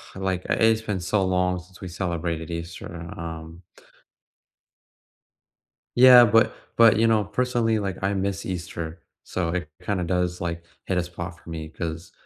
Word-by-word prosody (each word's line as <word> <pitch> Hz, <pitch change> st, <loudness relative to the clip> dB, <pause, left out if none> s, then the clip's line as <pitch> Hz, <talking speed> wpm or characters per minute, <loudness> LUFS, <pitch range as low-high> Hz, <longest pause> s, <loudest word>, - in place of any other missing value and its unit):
like, 95 Hz, -1 st, -2 dB
i -, -, +3 dB
it's 110 Hz, 0 st, +3 dB
been 105 Hz, -4 st, -3 dB
so 95 Hz, +2 st, +1 dB
long 90 Hz, -1 st, +1 dB
since 90 Hz, +1 st, -16 dB
we 95 Hz, -, -5 dB
celebrated 85 Hz, -2 st, -3 dB
Easter, 85 Hz, 0 st, -7 dB
um 80 Hz, +1 st, -7 dB, 2.3 s
Yeah, 125 Hz, 0 st, +9 dB
but 115 Hz, 0 st, +4 dB, 0.2 s
but, 115 Hz, -2 st, +7 dB
you 115 Hz, -, +4 dB
know, 110 Hz, -2 st, +3 dB
personally, 120 Hz, -1 st, 0 dB
like, 95 Hz, -3 st, -3 dB
I 100 Hz, +1 st, +1 dB
miss 100 Hz, 0 st, -2 dB
Easter, 85 Hz, -3 st, -5 dB, 0.2 s
so 85 Hz, -3 st, -2 dB
it 85 Hz, -3 st, -3 dB
kinda 95 Hz, -4 st, -1 dB
does, 90 Hz, 0 st, -1 dB
like, 85 Hz, -1 st, -4 dB, 0.2 s
hit 95 Hz, -, -1 dB
a 90 Hz, -, +2 dB
spot 85 Hz, 0 st, -7 dB
for 85 Hz, -, -13 dB
me 80 Hz, -1 st, -5 dB
'cause, 80 Hz, +2 st, -6 dB
90 Hz, 155 wpm, -25 LUFS, 85-100 Hz, 2.3 s, Yeah